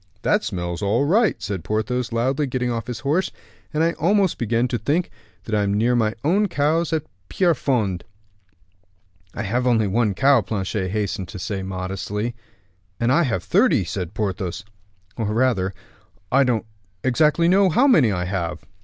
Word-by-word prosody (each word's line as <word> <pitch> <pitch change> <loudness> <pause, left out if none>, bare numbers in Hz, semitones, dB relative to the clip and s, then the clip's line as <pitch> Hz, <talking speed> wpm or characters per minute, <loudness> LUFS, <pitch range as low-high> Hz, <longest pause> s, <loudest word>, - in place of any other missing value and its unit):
"That 210 - +2
smells 85 -2 -4
all 105 +7 +1
right," 210 +6 +2
said 95 -5 -4
Porthos, 115 +3 -1
loudly, 130 +5 0
getting 125 -1 -1
off 115 -1 -3
his 120 -1 -5
horse, 150 +8 +1 0.4
"and 155 +1 +1
I 165 - +3
almost 190 +3 +1
begin 120 +1 +1
to 120 - -1
think 155 +9 0 0.4
I 105 -2 +1
am 100 0 0
near 120 +4 +2
my 110 -2 +1
own 195 +8 +2
cows 160 +1 +1
at 160 -2 0 0.3
Pierrefonds." 125 - +1 1.3
"I 105 - -3
have 120 +5 0
only 115 -3 +3
one 105 0 +1
cow," 135 0 +4
Planchet 95 -2 -3
hastened 100 -2 -2
to 95 - -8
say 100 0 -3
modestly. 95 +4 -4 0.7
"And 120 +1 +2
I 150 - +4
have 115 - -1
thirty," - - +3
said 90 +2 -5
Porthos; 95 -1 -3 0.5
"or 110 - -1
rather, 110 -4 +1 0.6
I 135 +1 +4
don't 115 -3 0 0.4
exactly 150 +6 +3
know 190 +2 +5
how 245 - +3
many 155 - +5
I 90 -2 -1
have." 90 -2 -3
115 Hz, 160 wpm, -22 LUFS, 100-145 Hz, 1.3 s, know